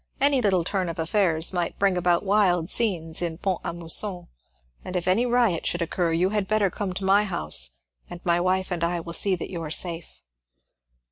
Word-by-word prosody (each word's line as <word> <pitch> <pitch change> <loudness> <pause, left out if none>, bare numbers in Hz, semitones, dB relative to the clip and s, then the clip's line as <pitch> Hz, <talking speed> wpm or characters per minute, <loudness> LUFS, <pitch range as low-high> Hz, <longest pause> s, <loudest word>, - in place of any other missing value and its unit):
Any 275 -1 +3
little 190 -6 +2
turn 185 0 -2
of 165 - -6
affairs 165 0 +1
might 175 -2 -2
bring 195 -2 +2
about 175 -1 +1
wild 190 -4 +2
scenes 170 -8 -2
in 170 -2 -3
Pont 185 0 -2
a - - -3
Mousson, 175 +2 0 0.5
and 185 - -7
if 180 0 -2
any 220 +7 +2
riot 235 -8 +1
should 175 0 0
occur 170 0 -1
you 175 +3 +2
had 210 -2 -1
better 210 -3 +1
come 200 -3 -4
to 190 - -4
my 200 +2 +4
house, 75 - 0 0.3
and 175 - -8
my 170 -1 +2
wife 185 +1 0
and 170 -2 -2
I 170 +1 0
will 170 0 -7
see 195 +2 +2
that 175 - -7
you 170 -3 -5
are 160 - -5
safe." 170 +1 -3
180 Hz, 205 wpm, -25 LUFS, 170-195 Hz, 0.5 s, my